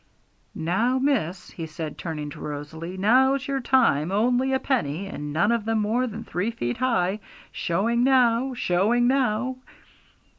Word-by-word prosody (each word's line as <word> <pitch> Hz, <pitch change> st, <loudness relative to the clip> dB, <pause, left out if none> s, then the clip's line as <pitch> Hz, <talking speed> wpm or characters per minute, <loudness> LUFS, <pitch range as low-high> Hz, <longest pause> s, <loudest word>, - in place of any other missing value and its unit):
'Now, 225 Hz, +10 st, +1 dB
miss,' 215 Hz, -, -1 dB
he 165 Hz, -2 st, -6 dB
said, 155 Hz, -1 st, -6 dB
turning 150 Hz, -3 st, -5 dB
to -, -, -10 dB
Rosalie, 160 Hz, +5 st, -6 dB
'now's 260 Hz, +6 st, +3 dB
your 275 Hz, -1 st, -1 dB
time; 230 Hz, -, +2 dB
only 245 Hz, +6 st, +2 dB
a 265 Hz, -, +2 dB
penny, 195 Hz, -, -1 dB
and 150 Hz, -6 st, -6 dB
none 170 Hz, +9 st, +2 dB
of 235 Hz, -2 st, 0 dB
them 225 Hz, 0 st, 0 dB
more 230 Hz, +5 st, 0 dB
than 225 Hz, 0 st, -6 dB
three 180 Hz, +5 st, -2 dB
feet 120 Hz, -, -3 dB
high! 215 Hz, -6 st, +1 dB, 0.3 s
Showing 230 Hz, +8 st, 0 dB
now! 255 Hz, -1 st, +3 dB
Showing 230 Hz, +4 st, +2 dB
now!' 255 Hz, -1 st, +1 dB
220 Hz, 150 wpm, -25 LUFS, 170-255 Hz, 0.3 s, now's